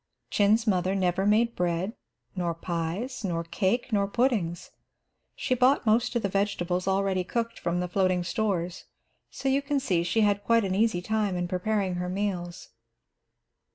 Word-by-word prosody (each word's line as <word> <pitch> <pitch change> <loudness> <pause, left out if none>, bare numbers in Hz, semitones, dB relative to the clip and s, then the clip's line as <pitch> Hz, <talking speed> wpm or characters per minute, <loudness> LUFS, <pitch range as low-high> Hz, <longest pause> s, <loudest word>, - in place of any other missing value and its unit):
Chin's 215 +2 +3
mother 190 -2 +1
never 190 +1 +1
made 230 +3 +3
bread, 180 +4 -1 0.4
nor 175 -3 -1
pies, 175 +10 -3
nor 170 -4 -1
cake, 205 +8 -1
nor 200 -1 +2
puddings. 205 -7 0 0.6
She - - -1
bought 255 +2 +3
most 230 +3 +2
of 235 - 0
the - - +2
vegetables 190 -2 -1
already 190 -1 +1
cooked 230 +5 -3
from 175 +1 -1
the 180 - -1
floating 185 -1 +1
stores, 180 -2 -2 0.4
so 270 - -5
you 270 +1 +3
can 280 0 0
see 185 -10 +1
she 175 +6 +1
had 205 -1 +2
quite 230 -1 +3
an 185 - -1
easy 195 -3 +1
time 210 -2 0
in 175 0 -1
preparing 190 +1 -1
her 180 - -3
meals. 185 -3 -3
195 Hz, 160 wpm, -27 LUFS, 180-220 Hz, 0.6 s, Chin's